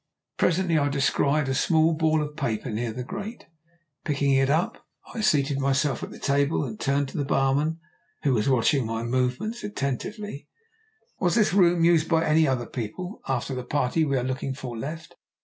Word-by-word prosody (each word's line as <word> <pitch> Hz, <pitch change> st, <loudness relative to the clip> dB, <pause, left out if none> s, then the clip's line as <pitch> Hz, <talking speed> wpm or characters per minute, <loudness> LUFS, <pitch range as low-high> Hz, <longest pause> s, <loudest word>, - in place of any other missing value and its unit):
Presently 175 Hz, -2 st, +2 dB
I 145 Hz, 0 st, +1 dB
descried 140 Hz, +1 st, +1 dB
a 135 Hz, -, 0 dB
small 160 Hz, +3 st, +3 dB
ball 155 Hz, -1 st, +2 dB
of 150 Hz, 0 st, -7 dB
paper 120 Hz, -5 st, -2 dB
near 115 Hz, +2 st, -2 dB
the 125 Hz, +3 st, -5 dB
grate. 200 Hz, -, -7 dB, 0.6 s
Picking 140 Hz, -2 st, +1 dB
it 135 Hz, 0 st, +3 dB
up 160 Hz, +5 st, 0 dB, 0.3 s
I 230 Hz, -, -3 dB
seated 140 Hz, -7 st, +2 dB
myself 140 Hz, +1 st, +1 dB
at -, -, -5 dB
the -, -, -10 dB
table 140 Hz, +2 st, +1 dB
and 110 Hz, -4 st, -7 dB
turned 140 Hz, +1 st, +1 dB
to -, -, -7 dB
the -, -, +1 dB
barman, 140 Hz, +4 st, +1 dB, 0.4 s
who 140 Hz, -, +3 dB
was 110 Hz, +2 st, +1 dB
watching 130 Hz, 0 st, +2 dB
my 115 Hz, 0 st, -3 dB
movements 130 Hz, -, -1 dB
attentively. 205 Hz, -, -4 dB, 0.7 s
"Was 175 Hz, +1 st, +1 dB
this 215 Hz, -5 st, +3 dB
room 175 Hz, -3 st, +4 dB
used 170 Hz, -2 st, +3 dB
by 165 Hz, -1 st, +3 dB
any 155 Hz, +1 st, +4 dB
other 130 Hz, -3 st, 0 dB
people 135 Hz, -, -6 dB
after 135 Hz, 0 st, -1 dB
the 125 Hz, -1 st, -4 dB
party 135 Hz, +4 st, 0 dB
we 140 Hz, -3 st, +1 dB
are 125 Hz, -, 0 dB
looking 130 Hz, +1 st, -3 dB
for 125 Hz, -3 st, -6 dB
left?" 155 Hz, +8 st, -7 dB
140 Hz, 185 wpm, -25 LUFS, 130-160 Hz, 0.7 s, room